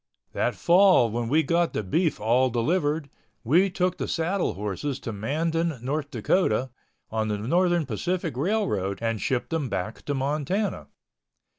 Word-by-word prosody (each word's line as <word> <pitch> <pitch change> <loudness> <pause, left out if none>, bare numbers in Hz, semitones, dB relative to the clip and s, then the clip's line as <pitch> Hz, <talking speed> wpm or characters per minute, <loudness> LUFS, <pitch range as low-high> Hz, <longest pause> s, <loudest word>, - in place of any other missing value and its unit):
That - - 0
fall 175 - +5
when 115 0 -2
we 155 +4 +3
got 170 +3 +1
the - - -2
beef 160 - 0
all 120 +4 +3
delivered, 145 +5 0 0.4
we 170 - +4
took 180 0 -1
the - - -2
saddle 175 +3 0
horses 105 +8 -3
to 115 - -5
Mandan, 160 +9 -1
North 140 +4 -3
Dakota, 130 - +1 0.4
on 110 -1 -1
the 105 -1 -1
Northern 175 - +1
Pacific 165 - -2
Railroad 135 - 0
and 115 -2 -2
shipped 130 +3 -1
them 155 -5 -1
back 105 +2 -4
to 145 - -1
Montana. 150 +9 -1
145 Hz, 150 wpm, -26 LUFS, 115-170 Hz, 0.4 s, fall